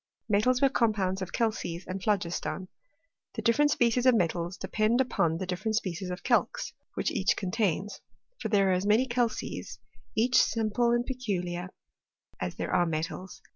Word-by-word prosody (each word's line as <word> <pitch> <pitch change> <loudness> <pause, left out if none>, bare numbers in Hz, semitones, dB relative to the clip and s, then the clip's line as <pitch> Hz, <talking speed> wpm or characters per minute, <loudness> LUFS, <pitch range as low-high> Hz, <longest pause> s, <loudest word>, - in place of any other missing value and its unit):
Metals 250 +5 +2
were 275 - +6
compounds 205 -7 +1
of 185 - -4
calces 205 -6 -2
and 185 +1 -5
phlogiston. 185 -2 -1 0.7
The - - -4
different 290 +6 +4
species 245 -1 +2
of 255 - +6
metals 175 -2 0
depend 220 +3 +1
upon 170 -10 +1
the 185 - -3
dif 180 0 -4
ferent 220 -1 0
species 185 -3 -2
of 180 +1 -5
calx - - +1 0.2
which - - 0
each - - +1
contains; 195 0 -1 0.4
for 220 - -3
there 200 -2 +3
are - - +4
as 185 +2 0
many 220 +5 +4
calces 240 -2 -2 0.4
(each 245 +3 +4
simple 230 +1 +1
and 240 0 +2
peculiar) 185 -9 -3 0.7
as - - -3
there - - -3
are 175 - +3
metals. 165 +3 -4
205 Hz, 165 wpm, -29 LUFS, 180-235 Hz, 0.7 s, were